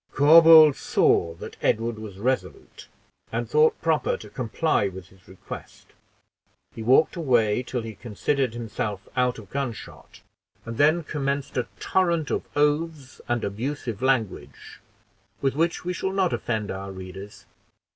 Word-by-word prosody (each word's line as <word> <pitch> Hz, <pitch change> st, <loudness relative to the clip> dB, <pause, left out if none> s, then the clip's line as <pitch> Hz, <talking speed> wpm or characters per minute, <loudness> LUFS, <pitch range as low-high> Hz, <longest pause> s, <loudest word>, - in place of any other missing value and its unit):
Corbould 155 Hz, 0 st, +8 dB
saw 85 Hz, -1 st, +2 dB
that -, -, -10 dB
Edward 115 Hz, 0 st, 0 dB
was 105 Hz, -3 st, -9 dB
resolute, 130 Hz, -, -3 dB, 0.4 s
and -, -, -2 dB
thought 455 Hz, 0 st, +3 dB
proper -, -, +1 dB
to -, -, -12 dB
comply 125 Hz, -1 st, 0 dB
with 95 Hz, -1 st, -9 dB
his 95 Hz, -1 st, -23 dB
request: 95 Hz, +1 st, -11 dB, 0.8 s
he -, -, -8 dB
walked 130 Hz, +10 st, +4 dB
away 120 Hz, -9 st, +2 dB
till 125 Hz, -1 st, -4 dB
he 110 Hz, -1 st, -7 dB
considered 120 Hz, +4 st, -2 dB
himself 105 Hz, -3 st, -5 dB
out 125 Hz, -1 st, +1 dB
of 105 Hz, -3 st, -13 dB
gunshot, 135 Hz, -5 st, -6 dB, 0.4 s
and 115 Hz, 0 st, -7 dB
then 155 Hz, +4 st, +4 dB
commenced 140 Hz, -2 st, -3 dB
a 125 Hz, -, -1 dB
torrent 170 Hz, -5 st, 0 dB
of -, -, 0 dB
oaths 150 Hz, -1 st, -1 dB
and 120 Hz, -1 st, -1 dB
abusive 115 Hz, +2 st, -4 dB
language, 130 Hz, -7 st, -2 dB, 0.6 s
with 135 Hz, -1 st, 0 dB
which 165 Hz, +3 st, 0 dB
we 180 Hz, -, -1 dB
shall 190 Hz, +2 st, -3 dB
not 190 Hz, -3 st, +1 dB
offend 110 Hz, -3 st, -2 dB
our 95 Hz, +1 st, -6 dB
readers. 95 Hz, +2 st, -10 dB
125 Hz, 140 wpm, -25 LUFS, 105-155 Hz, 0.8 s, Corbould